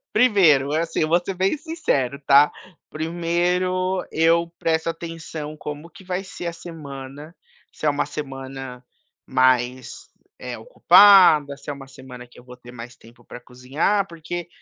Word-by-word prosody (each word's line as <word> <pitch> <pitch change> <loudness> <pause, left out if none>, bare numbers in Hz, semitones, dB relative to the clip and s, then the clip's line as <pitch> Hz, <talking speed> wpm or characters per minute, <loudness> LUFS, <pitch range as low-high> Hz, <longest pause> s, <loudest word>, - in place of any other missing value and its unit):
primeiro, 175 - +4
assim, 165 0 -1
vou 170 +3 +2
ser 195 - -4
bem 190 +9 0
sincero, 280 - -2
tá? 140 +2 +6 0.4
Primeiro 180 +3 -1
eu 165 +1 +2
presto 160 0 -1
atenção 165 -2 -7
como 150 +2 -8
que 190 - -16
vai 180 +1 -3
ser 190 -2 -8
a 170 - -2
semana, 145 -2 -10 0.4
se 155 - -6
é - - +4
uma 145 0 -1
semana 135 -3 -8 0.4
mais, 130 0 0 0.3
eh, - - -7
ocupada, 180 - +6
se 145 - -9
é - - -2
uma 135 -1 -11
semana 130 -2 -12
que 120 - -20
eu 125 - -15
vou 125 0 -13
ter 125 0 -14
mais 120 0 -10
tempo 115 +1 -20
para 120 - -11
cozinhar, 135 +12 -1
porque 170 0 -7
155 Hz, 150 wpm, -22 LUFS, 135-175 Hz, 0.4 s, tá